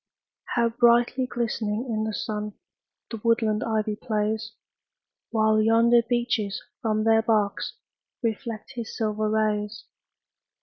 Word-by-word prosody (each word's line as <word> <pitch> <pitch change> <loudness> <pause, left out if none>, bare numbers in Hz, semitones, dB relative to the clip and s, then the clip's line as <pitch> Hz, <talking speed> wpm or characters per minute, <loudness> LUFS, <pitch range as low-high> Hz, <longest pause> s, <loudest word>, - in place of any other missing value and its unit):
How 235 -1 +3
brightly 240 +2 +3
glistening 230 -2 -2
in 220 -2 -1
the 220 - -3
sun 210 -1 -3 0.6
The 225 -2 -5
woodland 225 -2 +2
ivy 215 -1 0
plays! 215 -1 -2 0.8
While 220 -1 +3
yonder 230 +2 +5
beeches 235 -4 -1 0.2
from 215 -2 0
their 225 0 +4
barks 215 -3 0 0.5
Reflect 225 -1 -3
his 235 -3 -6
silver 215 -1 0
rays. 215 -1 -1
220 Hz, 115 wpm, -25 LUFS, 215-235 Hz, 0.8 s, yonder